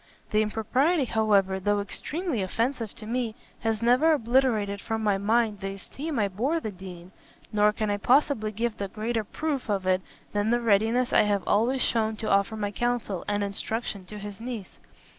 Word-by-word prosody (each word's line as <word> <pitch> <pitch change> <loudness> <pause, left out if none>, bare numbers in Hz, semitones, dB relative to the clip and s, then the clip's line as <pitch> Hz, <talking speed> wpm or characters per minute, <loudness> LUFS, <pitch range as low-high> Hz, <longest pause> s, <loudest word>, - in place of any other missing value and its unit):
The 215 - +4
impropriety, 255 +9 +1
however, 200 -4 +2
though 205 +2 +1
extremely 295 - -3
offensive 230 +3 -2
to 215 - -10
me, 230 -1 -2 0.2
has 225 -1 -1
never 255 +7 +5
obliterated 230 -6 +1
from 220 0 -2
my 205 -2 +2
mind 215 0 +2
the 195 0 -4
esteem 290 +9 -6
I 210 -3 +2
bore 250 - 0
the 220 - -4
Dean: 185 -2 -10 0.4
nor 210 0 +4
can 210 0 -2
I 205 - 0
possibly 240 -1 +2
give 225 0 -2
a 200 - -1
greater 225 +3 -2
proof 285 +2 -3
of 195 -2 0
it 185 0 +2 0.3
than 205 +1 0
the 240 +1 +3
readiness 230 +3 +2
I - - +7
have 205 -2 +1
always 240 +5 +2
shewn 220 -1 +1
to 215 - -3
offer 200 +2 +2
my 205 -1 -2
counsel 240 -5 -1
and 205 0 0
instruction 200 0 -3
to 210 - -8
his 205 +1 -8
niece. 235 -5 -6
215 Hz, 180 wpm, -27 LUFS, 200-240 Hz, 0.4 s, I